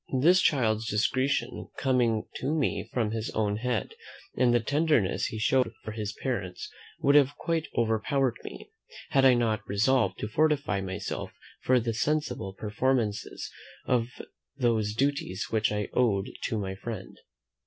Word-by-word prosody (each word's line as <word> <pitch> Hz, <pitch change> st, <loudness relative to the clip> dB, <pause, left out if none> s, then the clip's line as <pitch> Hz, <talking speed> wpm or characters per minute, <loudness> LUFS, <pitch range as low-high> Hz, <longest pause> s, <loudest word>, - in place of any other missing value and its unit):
The 165 Hz, +7 st, +6 dB
child's 115 Hz, -11 st, +2 dB
discretion 130 Hz, +6 st, +1 dB
in -, -, -8 dB
coming 120 Hz, -5 st, +1 dB
to 135 Hz, -, -2 dB
me 150 Hz, -4 st, -1 dB
of 115 Hz, -4 st, +1 dB
his 110 Hz, 0 st, -3 dB
own 105 Hz, -1 st, +1 dB
head, 125 Hz, -, -2 dB, 0.4 s
and 125 Hz, -1 st, +3 dB
the 120 Hz, -, +4 dB
tenderness 145 Hz, -, +1 dB
he 110 Hz, -, -5 dB
showed 125 Hz, +3 st, +2 dB
for 110 Hz, -, -5 dB
his 105 Hz, -1 st, -4 dB
parents 100 Hz, -9 st, -3 dB, 0.3 s
would 140 Hz, -, +4 dB
have 145 Hz, -1 st, +4 dB
quite 165 Hz, -2 st, -1 dB
overpowered 115 Hz, +3 st, +1 dB
me, -, -, -9 dB, 0.4 s
had 135 Hz, -1 st, +4 dB
I 130 Hz, -2 st, +7 dB
not 115 Hz, -3 st, +1 dB
resolved 115 Hz, +7 st, +2 dB
to -, -, -3 dB
fortify 145 Hz, -5 st, +1 dB
myself 95 Hz, +1 st, -5 dB, 0.3 s
for 130 Hz, 0 st, +3 dB
the 115 Hz, -1 st, -2 dB
seasonable 145 Hz, -6 st, -1 dB
performances 110 Hz, 0 st, -1 dB, 0.3 s
of 120 Hz, -2 st, +1 dB, 0.5 s
those 110 Hz, -5 st, +1 dB
duties 140 Hz, -8 st, -1 dB
which 110 Hz, -1 st, +2 dB
I 105 Hz, -1 st, -1 dB
owed 105 Hz, -6 st, +1 dB
to 110 Hz, -, -1 dB
my 95 Hz, -2 st, -3 dB
friend. 95 Hz, 0 st, -7 dB
115 Hz, 150 wpm, -28 LUFS, 105-135 Hz, 0.5 s, I